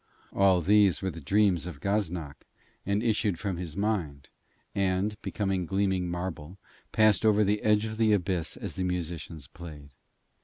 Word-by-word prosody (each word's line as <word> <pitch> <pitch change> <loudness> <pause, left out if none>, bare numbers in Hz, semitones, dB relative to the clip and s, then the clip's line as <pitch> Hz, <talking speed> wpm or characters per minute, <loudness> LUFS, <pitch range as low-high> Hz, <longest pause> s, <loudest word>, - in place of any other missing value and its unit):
All 95 -2 +4
these 100 +1 +4
were 95 - -1
the 85 0 -9
dreams 95 +1 +2
of 80 -6 -8
Gaznak, 90 -7 -3 0.4
and 100 +2 +1
issued 105 -5 +1
from 95 -2 -3
his 85 -2 -6
mind, 90 -10 -2 0.4
and, 95 +2 0
becoming 95 -4 -2
gleaming 95 -1 0
marble, 90 -1 -5 0.3
passed 110 -3 +4
over 105 -1 +4
the 105 +1 +1
edge 105 0 +3
of 110 0 -5
the 110 -1 +3
abyss 90 -4 0
as - - -6
the 95 - -1
musicians 85 -4 -4
played. 75 -1 -11
95 Hz, 155 wpm, -28 LUFS, 85-105 Hz, 0.4 s, All